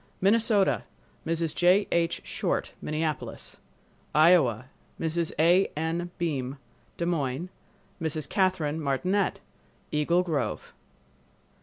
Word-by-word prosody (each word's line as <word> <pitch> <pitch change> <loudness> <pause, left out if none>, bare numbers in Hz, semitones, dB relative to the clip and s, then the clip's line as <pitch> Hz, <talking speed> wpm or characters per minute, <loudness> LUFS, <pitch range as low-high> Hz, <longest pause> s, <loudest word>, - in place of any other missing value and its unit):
Minnesota—Mrs. 195 -6 +1
J. 180 +3 +4
H. 170 -1 +1
Short, - - -2
Minneapolis. 155 -1 -4 0.6
Iowa—Mrs. 160 +2 +2
A. 175 +5 +4
N. 165 +2 -2
Beim, 140 -5 -2 0.4
Des 170 - -1
Moines; 160 -1 -1 0.5
Mrs. 155 -2 -2
Catherine 170 -5 0
Martinette, 180 +8 0 0.5
Eagle 170 +4 +2
Grove. 145 -10 -3
165 Hz, 85 wpm, -27 LUFS, 150-180 Hz, 0.6 s, J